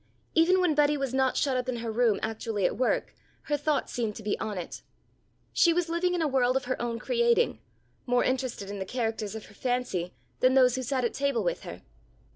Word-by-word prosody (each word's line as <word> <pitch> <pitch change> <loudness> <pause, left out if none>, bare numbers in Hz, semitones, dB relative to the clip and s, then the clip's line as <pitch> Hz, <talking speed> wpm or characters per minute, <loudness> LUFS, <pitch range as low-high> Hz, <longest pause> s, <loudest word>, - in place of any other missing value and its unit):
Even 350 +3 +4
when 360 -4 +3
Betty 295 0 +3
was 275 -2 -2
not 265 -1 +2
shut 270 -2 +1
up 255 0 -1
in 255 - -1
her 230 -1 -4
room 225 -2 +2
actually 220 -2 -2
at - - +1
work, 255 - 0 0.3
her 295 - 0
thoughts 290 0 -1
seemed 225 -4 -2
to 220 - -9
be 205 - 0
on 210 -2 -3
it. 175 - -6 0.7
She 340 - +5
was 345 0 0
living 355 +2 +1
in 340 - 0
a - - +2
world 260 -2 +2
of 265 - -4
her 255 -1 -2
own 235 -1 -2
creating, 475 - +2 0.5
more 245 0 +3
interested 255 -6 -2
in 205 - -5
the 190 - -3
characters 225 -3 -3
of 220 - -7
her - - -16
fancy 245 -8 -2 0.2
than 255 +1 +4
those 255 -2 +6
who 260 - -2
sat 255 0 -1
at 235 - -1
table 280 -3 0
with - - -1
her. - - -9
255 Hz, 225 wpm, -28 LUFS, 225-295 Hz, 0.7 s, those